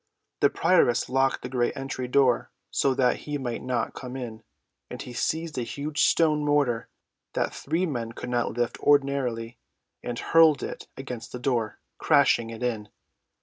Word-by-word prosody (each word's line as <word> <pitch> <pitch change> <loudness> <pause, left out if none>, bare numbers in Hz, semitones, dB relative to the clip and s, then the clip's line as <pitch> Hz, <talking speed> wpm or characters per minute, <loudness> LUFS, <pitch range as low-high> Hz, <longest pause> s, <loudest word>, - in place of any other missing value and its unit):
The - - +5
prioress 120 0 +3
locked 135 +1 +1
the - - -3
great 125 -2 0
entry 135 -1 -4
door 125 -1 +3 0.2
so 135 -1 +2
that 125 -2 +2
he 150 -1 -4
might 125 -4 -4
not 125 -3 -2
come 125 -1 -7
in, 115 -4 -6 0.5
and - - -7
he 125 - -7
seized 160 +2 -2
a - - -1
huge 145 +5 -1
stone 155 -2 +3
mortar 145 -6 +1 0.4
that - - -1
three 165 +6 -1
men 120 -8 -3
could 125 - -7
not 120 -1 -1
lift 120 -1 -1
ordinarily 130 -5 +1 0.4
and 120 -1 -4
hurled 160 0 +4
it - - -6
against 125 -4 -7
the 125 - -5
door, 120 -4 -1 0.2
crashing 115 -1 +3
it 115 +1 -7
in. 110 -4 -2
125 Hz, 165 wpm, -26 LUFS, 120-140 Hz, 0.5 s, The